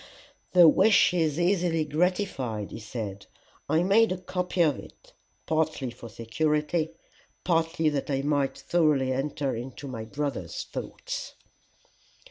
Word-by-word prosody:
"The 175 -2 +8
wish 195 +4 +5
is 160 -3 +1
easily 175 -3 +2
gratified," 150 - -1
he - - -7
said. 105 -3 -6 0.4
"I 160 +3 +3
made 210 +4 +4
a 185 - -1
copy 180 0 -2
of 150 -4 +1
it, - - -15 0.3
partly 155 -5 0
for 115 0 -11
security, 150 +8 -1 0.5
partly 165 -1 +1
that 145 -1 -3
I 135 -1 0
might 145 -2 0
thoroughly 150 -6 +2
enter 140 0 -2
into 130 +4 -7
my 115 -4 -6
brother's 145 +5 -4
thoughts." - - -6
155 Hz, 125 wpm, -27 LUFS, 135-175 Hz, 0.5 s, The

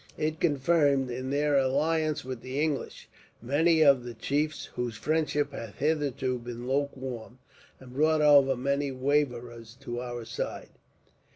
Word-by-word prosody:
It 155 +1 -2
confirmed, 140 -3 +2
in 130 +2 -4
their 145 +1 +1
alliance 155 +3 0
with 130 -2 -6
the 130 +2 -4
English, 150 -2 -2 0.3
many 160 +6 +3
of 140 -4 +5
the 120 -1 -7
chiefs 150 +6 -1
whose 120 -2 -3
friendship 150 0 0
had 115 -6 -8
hitherto 140 -4 -1
been 120 0 -7
lukewarm; 130 -3 -3 0.4
and 125 -1 -13
brought 155 +3 +3
over 140 -2 +6
many 140 +2 0
waverers 125 -4 -1
to 120 -3 -5
our 120 -2 -6
side. 115 +1 -5
135 Hz, 135 wpm, -28 LUFS, 125-150 Hz, 0.4 s, over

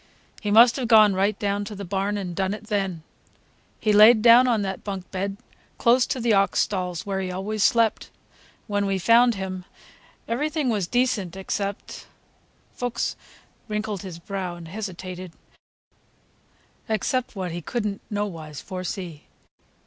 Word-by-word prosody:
He 210 - -2
must 230 +4 +7
have 255 -3 -2
gone 215 -3 +7
right 200 +2 +1
down 205 0 -1
to 210 0 -7
the 200 0 -6
barn 195 +3 -1
and 180 -3 -5
done 190 +2 -1
it 215 - -12
then. 195 -6 -2 0.8
He 215 - +1
layed 215 +1 +7
down 240 +2 +8
on 225 -4 +2
that 190 -1 -4
bunk 195 -3 -6
bed, 195 +1 -3 0.4
close 245 +2 +4
to 260 - -2
the 235 -2 +2
ox 195 -4 +2
stalls, 180 -4 -2
where 195 -1 -2
he 185 -1 -3
always 200 +3 -2
slept. 230 -2 +2 0.6
When 205 -2 -1
we 195 -1 0
found 230 +5 +4
him, 190 -1 -5 0.6
everything 290 +3 -1
was 205 -6 0
decent 210 -7 0
except,"—Fuchs 200 +4 -6 0.5
wrinkled 210 -3 -3
his 185 -4 -8
brow 185 0 -5
and 170 -2 -10
hesitated,—"except 190 +5 -7
what 185 -3 -3
he 175 +1 -5
could 235 +6 -3
n't 200 -1 -3
nowise 165 -8 -4
foresee. 185 -4 -6
200 Hz, 145 wpm, -24 LUFS, 185-220 Hz, 0.8 s, down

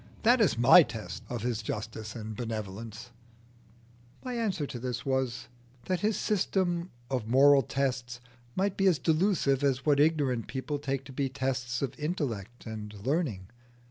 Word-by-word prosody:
That 240 +2 +5
is 195 - +3
my 125 +9 +9
test 105 - -5
of 120 -3 -4
his 120 -3 -1
justice 110 0 -5
and 110 -2 -6
benevolence." 110 0 -6 1.1
My 250 - -3
answer 200 -11 -1 0.4
was, 130 -3 -1 0.4
that 185 -1 0
his 210 0 +1
system 180 -3 0 0.2
of 125 -5 -1
moral 135 +3 +6
tests 125 -2 -2 0.4
might 195 +1 0
be 195 - +3
as 175 -5 +4
delusive 155 -2 +2
as 135 -2 +1
what 145 -2 +4
ignorant 145 -6 +2
people 140 +2 -3
take 135 -1 -3
to 135 - -10
be 135 +1 -1
tests 130 -1 -2
of 135 - -2
intellect 125 - -3
and 105 -2 -7
learning. 130 - -1
135 Hz, 145 wpm, -29 LUFS, 115-155 Hz, 1.1 s, my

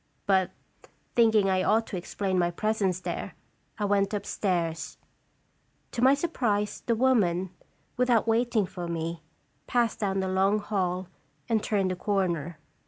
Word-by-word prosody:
But, 190 -2 +3 0.6
thinking 220 -4 +4
I 190 -1 +2
ought 220 +4 +2
to - - -6
explain 185 +1 -2
my 175 -1 +2
presence 195 0 0
there, - - -4 0.4
I 210 - -1
went 200 0 +1
upstairs. 170 -6 -2 0.9
To 235 - -3
my 265 +2 +6
surprise, 235 -10 -1
the 230 - +1
woman, 195 -8 +2 0.5
without 245 -3 +3
waiting 230 -2 +2
for 175 -1 -6
me, 165 0 -3 0.5
passed 240 -2 +1
down 195 -2 0
the 190 - -1
long 190 +2 +2
hall 185 -3 -2 0.4
and 225 -3 +1
turned 195 -4 0
a - - -2
corner. 175 -5 -1
195 Hz, 140 wpm, -27 LUFS, 180-220 Hz, 0.9 s, my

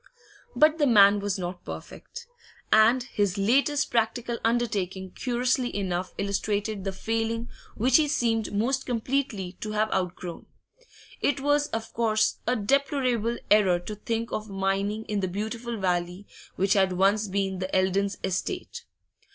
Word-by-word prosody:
But 310 +1 +4
the 290 - +4
man 205 -3 +6
was 200 -1 -2
not 180 -1 -5
perfect, 475 0 -9 0.5
and 225 +4 +5
his 205 -6 -1
latest 275 +8 +2
practical 235 +1 0
undertaking 200 -6 -1
curiously 250 +1 -1
enough 185 -2 -3
illustrated 200 +1 -2
the 195 - -1
failing 225 +3 -2 0.3
which 255 +7 +4
he 310 -2 +2
seemed 230 -7 0
most 255 +6 0
completely 230 -6 -2
to 215 0 -4
have 215 0 0
outgrown. 180 -1 -3 0.7
It 285 - +1
was 290 +1 +2
of 225 -3 -5
course 220 -1 +1
a 250 - +2
deplorable 250 -1 +1
error 200 -4 +5
to 210 - -6
think 230 +2 -3
of 215 0 -4
mining 195 +2 -1
in 210 -1 -2
the 190 - -1
beautiful 225 +5 -4
valley 180 0 -1 0.3
which 195 +1 +2
had 190 -2 +3
once 200 +3 +2
been 195 -1 -1
the 185 0 -3
Eldons' 190 +1 +1
estate. 370 - -3
215 Hz, 145 wpm, -26 LUFS, 195-240 Hz, 0.7 s, man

